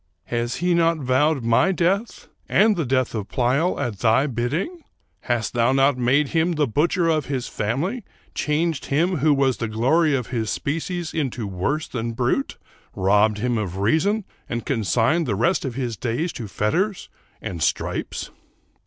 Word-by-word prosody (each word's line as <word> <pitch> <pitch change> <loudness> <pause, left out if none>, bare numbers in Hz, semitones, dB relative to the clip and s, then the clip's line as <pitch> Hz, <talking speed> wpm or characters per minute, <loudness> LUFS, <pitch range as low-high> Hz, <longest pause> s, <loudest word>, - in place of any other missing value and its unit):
Has 120 0 -2
he 175 +1 +1
not 165 -1 +3
vowed 135 +1 +1
my 115 +11 +3
death, 190 +5 -1 0.2
and 210 +1 +4
the 165 -7 -2
death 130 -1 +1
of 105 -3 -3
Pleyel, 135 +8 +1
at 120 -9 -3
thy 115 +6 +3
bidding? 150 - -2 0.4
Hast 120 -2 -2
thou 120 +2 +2
not 135 +1 +4
made 130 +4 +2
him 165 +1 +1
the 150 -2 +2
butcher 165 +7 +1
of 155 -3 +1
his 130 -3 -2
family? 155 - -2 0.2
— - - -33
changed 155 0 -1
him 170 +6 +1
who 150 +2 +3
was 135 -3 +2
the 115 - -2
glory 140 +8 +2
of 125 -3 -3
his 110 -3 -1
species 165 - -3
into 130 -7 -2
worse 100 - -2
than 115 -2 -4
brute? 125 - -1 0.3
— - - -36
robbed 105 +2 +3
him 120 +1 0
of 95 -3 -4
reason 170 - +1 0.2
and 120 0 -3
con 120 -6 -1
signed 130 - +2
the 105 - 0
rest 155 - +1
of 125 -3 -4
his 125 -5 -3
days 130 - -2
to 115 - -6
fetters 180 - -1 0.3
and 85 -3 -6
stripes - - -2
135 Hz, 175 wpm, -23 LUFS, 115-165 Hz, 0.4 s, and